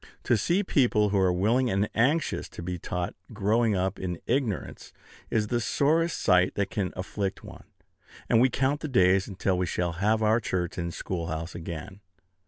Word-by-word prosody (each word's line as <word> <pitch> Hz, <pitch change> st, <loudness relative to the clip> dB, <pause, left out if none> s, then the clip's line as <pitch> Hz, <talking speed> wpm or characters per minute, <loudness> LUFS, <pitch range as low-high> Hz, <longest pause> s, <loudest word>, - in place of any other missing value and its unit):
To 120 Hz, -, +3 dB
see 175 Hz, -, +1 dB
people 120 Hz, -, +2 dB
who 100 Hz, 0 st, +1 dB
are 95 Hz, -1 st, +3 dB
willing 115 Hz, +8 st, +2 dB
and 100 Hz, 0 st, +1 dB
anxious 145 Hz, +8 st, +1 dB
to -, -, -9 dB
be 90 Hz, 0 st, -4 dB
taught 90 Hz, +1 st, -3 dB, 0.2 s
growing 110 Hz, +1 st, +2 dB
up 95 Hz, +1 st, -1 dB
in 90 Hz, -2 st, -4 dB
ignorance 120 Hz, -5 st, -2 dB, 0.4 s
is 110 Hz, -2 st, +1 dB
the 120 Hz, -1 st, 0 dB
sorest 160 Hz, +7 st, +1 dB
sight 90 Hz, -2 st, +3 dB
that 100 Hz, -1 st, -1 dB
can 100 Hz, -5 st, -2 dB
afflict 95 Hz, +1 st, -4 dB
one; -, -, -12 dB, 0.6 s
and 115 Hz, -, +4 dB
we 130 Hz, -, +5 dB
count 135 Hz, +3 st, 0 dB
the 155 Hz, -, -4 dB
days 95 Hz, -7 st, +3 dB
until 95 Hz, -2 st, -1 dB
we 90 Hz, -, 0 dB
shall 85 Hz, +1 st, -1 dB
have 105 Hz, +6 st, +1 dB
our 110 Hz, +2 st, +4 dB
church 90 Hz, -5 st, -3 dB
and 85 Hz, 0 st, -3 dB
schoolhouse 85 Hz, -2 st, -4 dB
again. 85 Hz, +3 st, -7 dB
100 Hz, 180 wpm, -27 LUFS, 90-120 Hz, 0.6 s, we